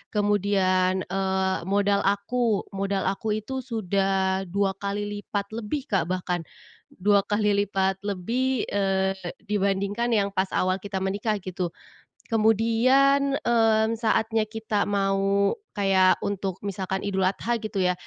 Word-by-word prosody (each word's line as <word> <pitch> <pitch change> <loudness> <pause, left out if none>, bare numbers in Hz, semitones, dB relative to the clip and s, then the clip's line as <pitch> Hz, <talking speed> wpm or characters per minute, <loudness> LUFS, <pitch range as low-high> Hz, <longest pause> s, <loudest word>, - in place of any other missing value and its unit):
Kemudian, 190 -3 +2
eee, 190 0 0
modal 200 0 +2
aku 210 +2 +1
modal 195 0 -1
aku 210 +3 -1
itu 240 +5 -4
sudah 195 -4 0
2 195 +2 +1
kali 200 +1 -2 0.2
lipat 200 0 -4
lebih, 230 +5 -3
Kak, 185 -5 +1
bahkan 180 -1 -1 0.5
dua 200 +2 +3
kali 205 0 +1
lipat 195 -1 0
lebih, 230 +6 -1
eee, 195 -1 0 0.3
dibandingkan 200 +3 0
yang 205 -3 +2
pas 190 0 +1
awal 185 0 +1
kita 195 0 -4
menikah 200 +3 -1
gitu. 180 -2 -4 0.6
Kemudian, 245 +6 +3
eee, 225 -2 +3
saatnya 220 -1 +1
kita 215 -2 -1
mau 195 0 +2 0.3
kayak 190 -2 +4
untuk 195 -2 -3
misalkan 190 -1 -3
Idul 190 -2 0
Adha 230 +5 -1
gitu 215 -2 -4
ya, 180 0 +3
200 Hz, 125 wpm, -25 LUFS, 190-220 Hz, 0.6 s, kayak